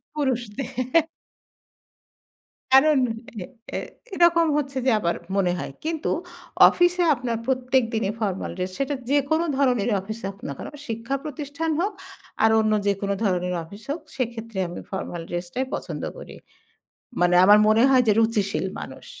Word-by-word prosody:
পুরুষদে 250 -3 -2 2.1
কারণ 280 +2 +6 0.4
এ - - -5 0.3
এ - - -1 0.4
এরকম 340 -1 +4
হচ্ছে 275 -2 -2
যে 260 - +5
আবার 170 -3 0 0.2
মনে 180 -3 +2
হয়। - - -5
কিন্তু 320 -1 -2 0.6
অফিসে 350 0 +2
আপনার 240 -2 -3
প্রত্যেক 260 0 +2
দিনই 215 -2 0
ফরমাল 195 -3 -2
ড্রেস, 185 0 -3
সেটা 275 +1 -1 0.2
যেকোনো 290 +4 +2
ধরনের 245 -5 +2
অফিসে 215 +2 -8
হোক 200 - -14
না - - -3
কেন। - - -6 0.2
শিক্ষা 230 +4 -3
প্রতিষ্ঠান 300 +2 -4
হোক 405 +3 0 0.5
আর 220 - +6
অন্য 215 0 +1
যেকোনো 200 0 0
ধরনের 180 -2 0
অফিস 200 +6 -12
হোক, 320 - -2 0.2
সেক্ষেত্রে 230 -4 -4
আমি 175 - -7
ফরমাল 175 -3 -4
ড্রেসটাই 175 +10 -3
পছন্দ - - -5
করি। - - -10 0.9
মানে 175 0 +4
আমার 205 +2 +8
মনে 220 +2 +5
হয় 255 -1 +5
যে - - +6
রুচিশীল 220 -3 0
মানুষ। - - -9
235 Hz, 145 wpm, -24 LUFS, 200-280 Hz, 2.1 s, আমার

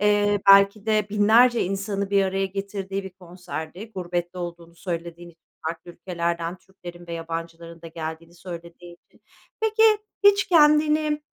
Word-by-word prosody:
eee, 205 -1 +2
belki 200 +2 +6
de 215 -1 +2
binlerce 225 +4 +4
insanı 200 +1 -3
bir 200 -1 +3
araya 195 0 -1
getirdiği 195 0 -5
bir 190 - -7
konserdi. 180 +2 -9
Gurbette 175 0 -4
olduğunu 170 -1 -7
söylediğin 170 -1 -6
i - - -23 0.3
farklı 165 +1 -5
ülkelerden 170 -1 -3
Türklerin 175 -2 -13
ve 170 - -7
yabancıların 165 0 -7
da 165 - -8
geldiğini 165 +1 -7
söylediğin 175 0 -10
için - - -27 0.4
Peki, 440 0 +1 0.4
hiç 400 0 +5
kendini, 300 -2 +3
185 Hz, 135 wpm, -24 LUFS, 170-205 Hz, 0.4 s, belki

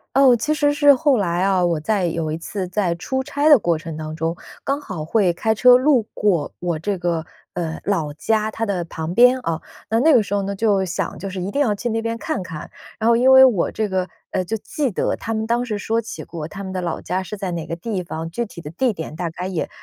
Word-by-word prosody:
哦， 265 -2 +6
其 295 +7 0
实 290 -1 +2
是 290 -1 +6
后 280 +1 +3
来 175 -3 0
啊， 190 -2 +2
我 170 -2 +1
在 190 +3 0
有 160 -2 -2
一 - - -2
次 185 +3 -5
在 185 -1 0
出 265 +9 -2
差 285 +3 0
的 300 -2 +9
过 170 -7 0
程 160 0 -7
当 155 0 -6
中， 165 +1 -2 0.3
刚 280 +1 -1
好 175 - -6
会 195 0 +2
开 220 +6 0
车 250 +3 +7
路 260 -3 +3
过 180 -8 +1
我 175 -2 -1
这 200 +5 -2
个， 170 -2 -1 0.3
呃， 165 -2 -3
老 165 -7 0
家 215 +8 0
它 225 +1 -2
的 190 -5 -1
旁 165 +1 -5
边 250 +3 +6
啊， 165 -10 -3 0.3
那 225 +1 +2
那 310 +2 +5
个 240 - +6
时 205 -1 -5
候 200 - +1
呢， 200 +1 -3
就 200 -1 +2
想 180 0 -3
就 195 - -5
是 185 -1 -5
一 190 - -3
定 280 - 0
要 235 -7 +2
去 205 +4 -4
那 225 0 -1
边 230 0 -2
看 305 - -3
看。 160 -4 -8 0.3
然 220 - 0
后 235 - +5
因 255 +3 +5
为 265 0 +9
我 215 -10 +2
这 215 -1 -1
个， 185 -1 -1 0.2
呃， 185 - 0
就 220 +5 -3
记 270 +3 -2
得 - - 0
他 225 - -4
们 220 0 -2
当 235 +1 +1
时 215 -4 -3
说 225 +3 -1
起 230 - -8
过 165 -3 -6
他 195 +5 -8
们 190 -1 -6
的 185 - -2
老 170 -2 -3
家 185 +2 -2
是 210 +3 -7
在 195 -2 -3
哪 170 -2 -4
个 165 +1 -5
地 190 0 -3
方， 165 -1 -5
具 235 +8 -3
体 200 - -11
的 150 -3 -7
地 240 +9 0
点 160 -5 -7
大 170 +1 -3
概 180 +3 -5
也 185 -4 -3
195 Hz, 280 characters per minute, -21 LUFS, 170-230 Hz, 0.3 s, 的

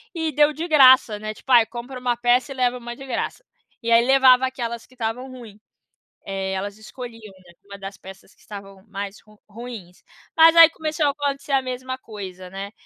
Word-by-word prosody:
e 320 -1 -2
deu 295 +1 +3
de 320 +4 -5
graça, 260 -8 +6
né, 215 0 -5
tipo 265 - -9
aí, 235 -2 +7
compra 250 +2 -8
uma 245 -1 -1
peça 245 +2 +1
e - - -14
leva 250 -1 0
uma 240 0 -8
de 270 - -11
graça. 265 - -4 0.4
E 230 - -2
aí 230 0 +6
levava 260 0 +5
aquelas 235 -3 -6
que 255 - -23
estavam 245 +3 -4
ruim. 230 -5 -12 0.7
Eh, 195 -1 -4
elas 200 +2 -5
escolhiam, 225 -2 -11
né, 175 - -17
uma 200 0 -11
das 195 0 -9
peças 190 +1 -14
que - - -33
estavam 195 -2 -11
mais 200 +1 -7
ru 215 -1 -22
ruins. 210 -5 -11 0.4
Mas 325 +1 +7
aí 330 -1 +9
começou 310 -1 -3
a - - +3
acontecer 280 0 -4
a 270 - +3
mesma 255 0 -5
coisa, 190 -6 -10
né. 195 +2 -7
240 Hz, 200 wpm, -22 LUFS, 205-265 Hz, 0.7 s, aí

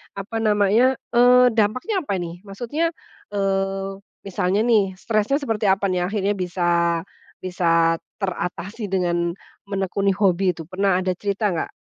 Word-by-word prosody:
apa 200 +3 -7
namanya, 215 +4 +3 0.2
eee, 250 +1 +6
dampaknya 235 - 0
apa 200 - 0
ini 175 -1 -5
maksudnya, 240 +11 -2 0.5
eee, 195 0 -1 0.3
misalnya 195 +2 0
nih 200 -6 +2
stresnya 215 +6 0
seperti 225 -8 -1
apa 195 +1 +2
nih 185 -2 0
akhirnya 205 -1 0
bisa 180 -2 -3 0.7
bisa 170 -2 +2 0.2
teratasi 190 +2 -4
dengan 175 -2 0 0.4
menekuni 195 0 0
hobi 190 -2 +2
itu, 165 -2 -4
pernah 185 +2 +1
ada 185 0 0
cerita 200 +1 -1
enggak 165 - -2
195 Hz, 130 wpm, -22 LUFS, 185-215 Hz, 0.7 s, eee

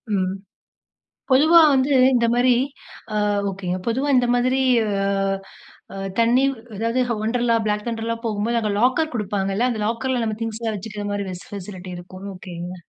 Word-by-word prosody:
ம். 185 0 0 1.0
பொதுவா 310 +6 +7
வந்து 265 +1 +2 0.2
இந்த 235 -2 +3
மாரி 245 +1 +4 0.6
ஆ - - +1 0.3
ஒகேங்க. 185 -2 -3
பொதுவா 255 +5 0
இந்த 250 -1 +3
மாதிரி 255 +2 +1 0.3
அ - - -1 1.1
அ - - -7 0.2
தண்ணீ 235 +3 +4 0.3
அதாவது 230 +4 0 0.2
Wonderla, 235 +1 +1
Black 210 0 0
thunderலா 230 0 -2
போகும்போது, 225 +1 0
அங்க 210 -2 -1
லாக்கர் 285 +6 +2
குடுப்பாங்கல்ல, 205 +1 0
அந்த 225 -3 -3
லாக்கர்ல 240 +2 -1
நம்ம 220 -1 -2
திங்ஸ்ல்லாம் 225 -1 -3
வச்சுக்கிற 205 +1 -6
மாரி 200 -2 -3
ஃபெசிலிட்டி 185 -2 -8
இருக்கும். 185 +2 -10
ஒகேங்க. 180 -1 -7
225 Hz, 140 wpm, -22 LUFS, 195-245 Hz, 1.1 s, பொதுவா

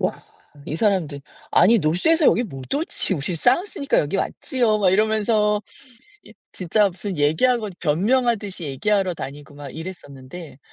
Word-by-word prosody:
와 - - -2 0.4
이 155 - -3
사람들 170 -9 0 0.3
아니 195 +7 +5
North에서 230 - +2
여기 240 - +3
못 135 - -9
오지. 285 - 0
"우리 150 +4 -3
South니까 280 - +1
여기 150 +6 0
왔지요." 225 +1 0
막 190 -3 +3
이러면서 210 +1 +2 0.6
이 - - -17 0.2
진짜 200 +3 +1
무슨 185 +1 -6
얘기하고 210 +10 +1
변명하듯이 205 - 0
얘기하러 185 +7 0
다니고 145 0 -9
막 145 -2 -9
이랬었는데 160 -3 -9
190 Hz, 365 characters per minute, -22 LUFS, 155-220 Hz, 0.6 s, 아니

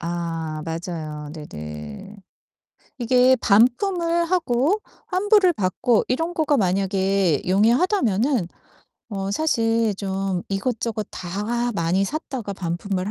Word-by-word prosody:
아 165 -2 -3
맞아요. 160 -3 -5
네네. 75 - -8 0.8
이게 250 +1 +4
반품을 335 - +3
하고 335 - +1 0.3
환불을 380 -1 +4
받고 210 +3 +1
이런 325 +7 -1
거가 310 -4 +2
만약에 190 - +1
용이하다면은 230 - +2 0.6
어 195 -3 -3
사실 225 -4 +1
좀 195 -2 -2
이것저것 215 +1 -2
다 215 +7 -2
많이 185 0 +1
샀다가 250 -4 -4
반품을 185 +2 -3
205 Hz, 220 characters per minute, -23 LUFS, 180-255 Hz, 0.8 s, 이게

